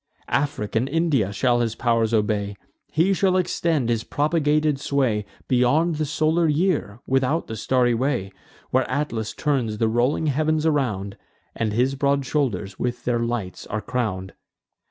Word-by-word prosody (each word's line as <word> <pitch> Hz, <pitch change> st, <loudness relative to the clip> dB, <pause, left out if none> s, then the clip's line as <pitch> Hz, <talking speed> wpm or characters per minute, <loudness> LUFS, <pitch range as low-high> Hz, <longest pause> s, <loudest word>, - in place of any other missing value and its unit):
Afric 140 Hz, -8 st, -1 dB
and 120 Hz, +4 st, +1 dB
India 145 Hz, -, +1 dB
shall 120 Hz, +4 st, +2 dB
his 115 Hz, -2 st, 0 dB
pow'r 115 Hz, -2 st, +2 dB
obey; 105 Hz, -2 st, 0 dB, 0.4 s
He 175 Hz, +5 st, +3 dB
shall 185 Hz, -1 st, +2 dB
extend 170 Hz, -6 st, 0 dB
his 115 Hz, -1 st, 0 dB
propagated 150 Hz, -1 st, +1 dB
sway 125 Hz, -8 st, 0 dB, 0.2 s
Beyond 145 Hz, +7 st, +2 dB
the 155 Hz, -1 st, -1 dB
solar 155 Hz, +3 st, +2 dB
year, 150 Hz, -, 0 dB
without 135 Hz, +5 st, +1 dB
the 110 Hz, -, -6 dB
starry 125 Hz, +2 st, +2 dB
way, 120 Hz, -5 st, -1 dB, 0.4 s
Where 130 Hz, 0 st, +1 dB
Atlas 125 Hz, -5 st, -2 dB
turns 125 Hz, -8 st, 0 dB
the 115 Hz, -, +2 dB
rolling 120 Hz, +7 st, +1 dB
heav'ns 155 Hz, +2 st, +1 dB
around, 110 Hz, -11 st, 0 dB, 0.4 s
And 110 Hz, -2 st, -1 dB
his 125 Hz, +5 st, +1 dB
broad 140 Hz, 0 st, +1 dB
shoulders 120 Hz, -9 st, -1 dB
with 120 Hz, -1 st, -2 dB
their 120 Hz, -1 st, +1 dB
lights 115 Hz, -5 st, -3 dB
are 110 Hz, -, -2 dB
crown'd. 105 Hz, -7 st, -3 dB
130 Hz, 150 wpm, -23 LUFS, 110-150 Hz, 0.4 s, He